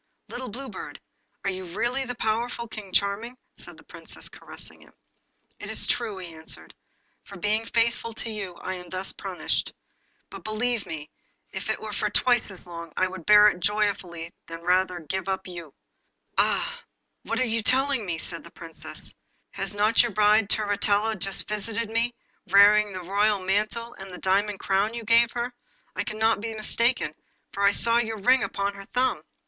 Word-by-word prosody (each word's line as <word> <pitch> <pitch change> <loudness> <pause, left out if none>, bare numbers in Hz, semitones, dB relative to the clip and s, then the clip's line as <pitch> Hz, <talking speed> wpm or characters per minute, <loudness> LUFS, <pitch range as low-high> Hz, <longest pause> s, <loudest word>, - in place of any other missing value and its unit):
Little 255 +1 -5
Blue 265 +6 -5
Bird, 210 - -8 0.4
are 195 - +1
you 185 0 -5
really 235 +9 -1
the 245 -1 -4
powerful 235 +1 -1
King 210 -3 -8
Charming?' 205 +6 0 0.2
said - - -10
the - - -16
Princess, - - -9
caressing - - -8
him. - - -19 0.7
'It - - -7
is - - +2
too - - +3
true,' 225 -5 -4
he 180 -3 -8
answered. 160 0 -8 0.5
'For 200 - -11
being 215 +4 +1
faithful 230 0 +1
to 225 - -3
you 200 -5 -5
I 185 - -4
am 180 -1 -8
thus 185 +2 -4
punished. - - -2 0.6
But - - -9
believe 220 +1 -1
me, 150 -2 -6 0.4
if - - -5
it - - 0
were - - -6
for - - 0
twice 245 -3 +3
as 190 -3 -4
long 170 -1 -8
I - - +4
would 185 -3 -9
bear 210 0 +9
it 180 - -4
joyfully 185 -4 -1 0.2
rather 180 +2 +1
than 170 -2 -8
give 190 +4 -2 0.2
you 175 -3 -7
up.' 140 - -23 0.7
'Oh! - - +2 0.4
what 230 +3 -2
are - - +4
you 230 -1 +1
telling 265 +1 +3
me?' 175 -4 -2
cried - - -6
the - - -12
Princess. - - -5 0.4
'Has 195 +1 -2
not 215 +2 +5
your 240 -3 0
bride, 210 0 +4
Turritella, 210 +1 +2
just 195 0 -2
visited 220 +2 -2
me, 235 +2 +1 0.3
wearing 205 +2 +7
the 185 -1 -6
royal 205 +3 +2
mantle 215 +5 0
and 195 0 -8
the 180 - -7
diamond 200 +2 +1
crown 200 +4 +1
you 235 - -4
gave 230 +1 +5
her? 245 +1 -2 0.4
I - - 0
cannot 220 0 +1
be 225 0 -4
mistaken, 235 +3 +1 0.4
for 200 - -3
I 200 - +7
saw 230 +3 +5
your 225 -2 -1
ring 250 +6 +5
upon 200 0 -1
her 195 0 -10
thumb. 255 +1 +2
210 Hz, 185 wpm, -26 LUFS, 190-230 Hz, 0.7 s, bear